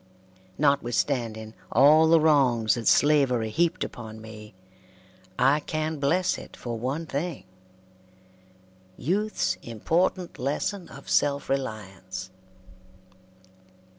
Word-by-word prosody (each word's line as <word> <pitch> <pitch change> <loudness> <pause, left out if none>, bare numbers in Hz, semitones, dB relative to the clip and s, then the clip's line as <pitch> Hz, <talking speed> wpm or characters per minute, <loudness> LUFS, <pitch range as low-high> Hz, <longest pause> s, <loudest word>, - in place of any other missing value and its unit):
Notwithstanding 120 -5 0 0.2
all 150 +6 +6
the 165 0 +6
wrongs 135 -8 +3
that 120 -2 -3
slavery 130 -7 +3
heaped 170 +6 +1
upon 110 -2 -8
me, 110 -2 -12 0.8
I 135 +4 +4
can 155 0 -3
bless 180 +6 +1
it - - -12
for 120 -1 -5
one 130 +8 -3
thing 160 +4 -4 1.5
youth's 210 +8 -1
important 170 - -1
lesson 170 +8 -2
of 140 - -12
self 140 -1 +1
reliance. 95 -7 -5
140 Hz, 95 wpm, -26 LUFS, 115-155 Hz, 1.5 s, all